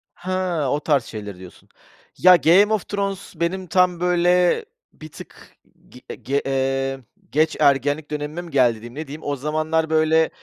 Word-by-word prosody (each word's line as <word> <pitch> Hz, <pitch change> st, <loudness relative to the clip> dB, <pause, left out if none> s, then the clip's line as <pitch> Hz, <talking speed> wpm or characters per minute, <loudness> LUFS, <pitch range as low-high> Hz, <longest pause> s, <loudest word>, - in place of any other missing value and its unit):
He, 185 Hz, -, -7 dB, 0.4 s
o 145 Hz, -, 0 dB
tarz 145 Hz, -4 st, +1 dB
şeyleri 105 Hz, -5 st, -8 dB
diyorsun! 90 Hz, -1 st, -15 dB, 0.5 s
Ya, 180 Hz, 0 st, +7 dB
Game 190 Hz, +6 st, +4 dB
of 210 Hz, -4 st, -2 dB
Thrones 200 Hz, -1 st, -4 dB
benim 180 Hz, +3 st, -3 dB
tam, 180 Hz, 0 st, +2 dB
böyle, 180 Hz, -, +2 dB, 0.3 s
bir 155 Hz, -, -12 dB
tık -, -, -14 dB, 0.3 s
g 125 Hz, -, -11 dB
ge 140 Hz, +2 st, -2 dB
eee, 135 Hz, 0 st, -1 dB, 0.3 s
geç 155 Hz, +2 st, +1 dB
ergenlik 145 Hz, +1 st, +1 dB
dönemime 150 Hz, +3 st, -4 dB
mi, 175 Hz, -1 st, -12 dB
geldi 130 Hz, -4 st, +3 dB
diyeyim? 120 Hz, +3 st, -12 dB
Ne 155 Hz, +1 st, -6 dB
diyeyim? 150 Hz, +3 st, -9 dB
O 145 Hz, 0 st, -2 dB
zamanlar, 155 Hz, +3 st, -1 dB
böyle, 160 Hz, 0 st, +3 dB
155 Hz, 160 wpm, -21 LUFS, 135-175 Hz, 0.5 s, Ya